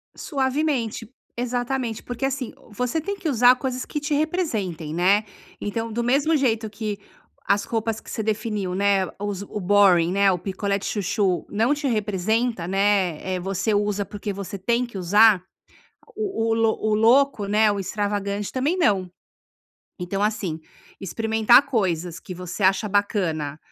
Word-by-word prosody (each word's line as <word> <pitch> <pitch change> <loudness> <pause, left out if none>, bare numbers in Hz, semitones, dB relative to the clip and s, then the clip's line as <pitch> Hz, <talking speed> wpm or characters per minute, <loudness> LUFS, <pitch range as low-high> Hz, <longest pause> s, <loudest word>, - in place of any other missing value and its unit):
Suavemente. 265 - -1 0.3
Exatamente. 245 -1 -2
Porque 245 +2 -3
assim, 270 -2 -3 0.2
você 250 +8 -1
tem 400 +6 -3
que 345 -5 -3
usar 250 0 +6
coisas 255 -1 -4
que 295 - -4
te 295 +1 -2
representem, 225 - -1
né. 195 +5 +3 0.4
Então, 225 +2 -3
do 235 +2 -2
mesmo 280 +6 +2
jeito 225 -6 +1
que 210 -1 -4 0.5
as 200 0 +2
roupas 225 -1 -2
que - - -15
você 220 - -3
definiu, 210 -4 -2
né, 195 -1 +2
os 205 -2 -3
o 205 +1 -6
boring, 185 -3 +4
né, 200 0 +4
o 180 - 0
picolé 200 +2 -2
de 195 - -8
chuchu, 195 -3 0
não 225 +7 +2
te 290 -1 -2
representa, 215 -2 0
né, 195 -4 +1 0.2
eh, - - -2
você 195 +3 -1
usa, 205 -1 0
porque 205 +1 -5
você 200 0 -6
tem 235 +5 0
que 235 -5 -9
usar, 200 +1 +5 0.7
o 385 - -1
o 225 - +3
loc 225 -1 +1
o 215 -1 +2
louco, 230 0 +3
né, 210 +1 +3
o 205 - -1
extravagante, 200 +1 -2
também 280 +7 0
não. 195 - +2 0.9
Então 195 +3 -3
assim, 190 -7 -1 0.4
experimentar 225 +6 +3
coisas 180 - -1
que 185 - -8
você 180 +3 -7
acha 195 +3 +3
bacana 170 -8 0
210 Hz, 155 wpm, -23 LUFS, 195-240 Hz, 0.9 s, usar